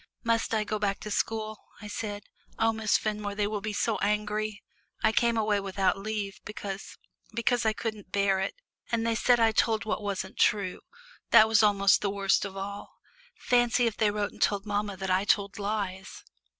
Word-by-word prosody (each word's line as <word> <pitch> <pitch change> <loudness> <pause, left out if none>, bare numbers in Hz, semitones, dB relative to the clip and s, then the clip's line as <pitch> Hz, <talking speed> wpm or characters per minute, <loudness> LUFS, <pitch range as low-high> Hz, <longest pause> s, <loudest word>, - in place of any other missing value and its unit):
"Must 230 -1 +1
I 215 - +1
go 215 0 -3
back 200 -1 0
to 210 - -6
school?" 215 0 -2 0.2
I 210 - -8
said. 205 0 -5 0.3
"Oh, 225 0 +2
Miss 220 -1 +2
Fenmore, 210 -1 -3
they 205 0 +1
will 210 0 -3
be 215 +1 -3
so 220 +2 0
angry 210 0 -1 0.4
I 220 - +5
came 235 +1 +2
away 210 -2 +2
without 195 -1 0
leave, 200 -1 -4
because 200 -2 -7 0.4
because 235 0 +1
I 220 - +3
couldn't 215 -4 -5
bear 200 -1 +2
it, 190 - -2 0.4
and 230 -1 0
they 230 - +2
said 240 +2 +3
I 225 -1 +4
told 220 0 +1
what 215 0 -2
wasn't 190 -2 -4
true 200 -5 +2 0.5
that 220 - +8
was 220 -1 +4
almost 200 -2 +4
the 205 - 0
worst 200 0 +1
of 195 -1 -7
all. 200 +1 -7 0.4
Fancy 245 0 +2
if 225 -3 0
they 215 -1 +2
wrote 205 0 -2
and - - -17
told 200 -1 +1
mamma 205 -1 -2
that 190 0 -3
I 185 +1 +3
told 200 -1 +1
lies." 200 -2 -4
210 Hz, 190 wpm, -28 LUFS, 200-220 Hz, 0.5 s, that